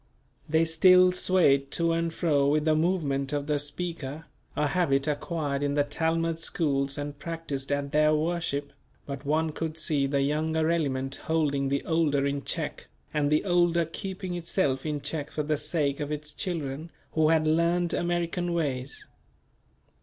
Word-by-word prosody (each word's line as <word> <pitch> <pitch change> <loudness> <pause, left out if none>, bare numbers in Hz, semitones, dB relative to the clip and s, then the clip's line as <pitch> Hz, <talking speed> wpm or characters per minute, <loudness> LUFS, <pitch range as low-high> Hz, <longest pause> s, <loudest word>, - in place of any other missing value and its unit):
They 160 +1 +3
still 180 +3 +6
swayed 155 -7 +3
to 170 0 +2
and 165 0 0
fro 150 -5 +1
with 150 +1 +2
the 155 - +4
movement 155 -5 0
of 145 -1 -1
the 150 -1 0
speaker, 150 0 -4 0.3
a 150 - +1
habit 140 -7 +1
acquired 145 -1 -2
in 145 0 0
the 145 - +3
Talmud 165 +2 -1
schools 140 -4 0
and 145 0 -5
practiced 150 -5 -4
at 140 0 -1
their 150 0 +4
worship; 155 -3 -2 0.3
but 140 0 -7
one 155 +2 +1
could 160 +1 -4
see 145 -4 +1
the 140 0 +1
younger 160 +2 +1
element 135 -5 -1
holding 145 -4 +1
the 140 0 -1
older 155 -4 +2
in 140 0 -1
check, - - -3 0.3
and 145 -1 +1
the 150 +5 +2
older 175 -2 +3
keeping 185 +2 -5
itself 170 -5 -1
in 150 -1 -2
check 150 +1 -3
for 150 - -3
the 155 +1 0
sake 150 -1 -1
of 145 0 -3
its 150 0 -4
children 155 -3 -4 0.2
who 155 -1 +3
had 160 -1 +3
learned 170 +2 +2
American 175 0 -1
ways. 135 -5 -3
155 Hz, 160 wpm, -27 LUFS, 140-165 Hz, 0.3 s, still